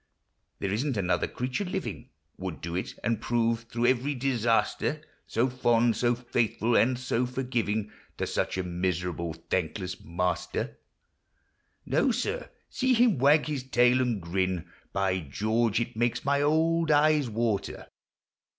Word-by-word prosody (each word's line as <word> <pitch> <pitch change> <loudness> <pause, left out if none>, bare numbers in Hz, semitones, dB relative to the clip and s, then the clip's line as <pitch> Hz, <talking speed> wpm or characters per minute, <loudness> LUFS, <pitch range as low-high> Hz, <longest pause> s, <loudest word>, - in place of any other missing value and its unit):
There 95 - -2
isn't 130 +3 -1
another 90 -2 +1
creature 125 +10 -3
living 185 - -4 0.3
Would - - -5
do 85 +1 -5
it, 90 - -3
and 115 -2 0
prove, 115 -1 0
through 120 +1 -1
every 130 +3 +2
disaster, 120 -3 +1 0.2
So 115 +3 +1
fond, 120 -2 +2
so 120 0 +2
faithful, 120 -1 0
and 125 +1 +4
so 125 -1 0
forgiving 120 -5 -2 0.3
To - - -1
such - - -1
a 95 - 0
miserable, 90 -1 -2
thankless 90 +3 -3
master! 90 +1 -2 1.1
No, 155 - +2
sir! 425 - -2
— - - -44
see 260 -1 +2
him 230 - +4
wag 145 +4 +5
his 150 -3 -2
tail 125 0 +3
and 120 -5 0
grin! 90 0 -1 0.2
By 95 -1 +1
George! 110 - 0
it 120 0 -3
makes 120 +2 0
my 140 0 +2
old 160 +2 +2
eyes 150 -2 +4
water! 110 -3 -2
120 Hz, 140 wpm, -28 LUFS, 95-130 Hz, 1.1 s, wag